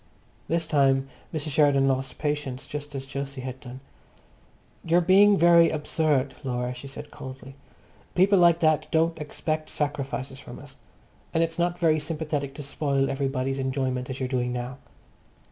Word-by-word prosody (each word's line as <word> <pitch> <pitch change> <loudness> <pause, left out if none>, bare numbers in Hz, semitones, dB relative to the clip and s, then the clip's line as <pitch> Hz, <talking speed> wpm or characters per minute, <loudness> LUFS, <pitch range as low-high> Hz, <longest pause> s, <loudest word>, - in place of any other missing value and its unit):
This 165 0 0
time 135 -2 +2 0.2
Mrs. 155 -1 -4
Sheridan 140 -2 +4
lost 135 0 -1
patience 145 -4 -3
just 145 0 -7
as 135 0 -6
Jose 140 -1 -4
had 130 0 -6
done. 130 0 -10 1.0
"You 170 +1 +3
are - - +5
being 195 +3 +6
very 170 -1 +6
absurd, 150 -3 0
Laura," 125 -1 -2
she 140 - -9
said 135 +2 -9
coldly. 135 -1 -9 0.6
"People 195 +2 +5
like 170 -1 +5
that 155 -2 +3
don't 165 0 +1
expect 155 +1 -3
sacrifices 140 -2 -3
from - - -10
us. - - -11 0.6
And 165 - +4
it's 165 +1 -3
not 175 0 +1
very 160 -3 +3
sympathetic 150 -3 -3
to 145 - -6
spoil 140 -1 0
everybody's 135 -1 -1
enjoyment 130 -1 -1
as 130 - -5
you're 130 - -1
doing 125 -1 -1
now." 125 +2 -5
140 Hz, 160 wpm, -26 LUFS, 135-160 Hz, 1.0 s, being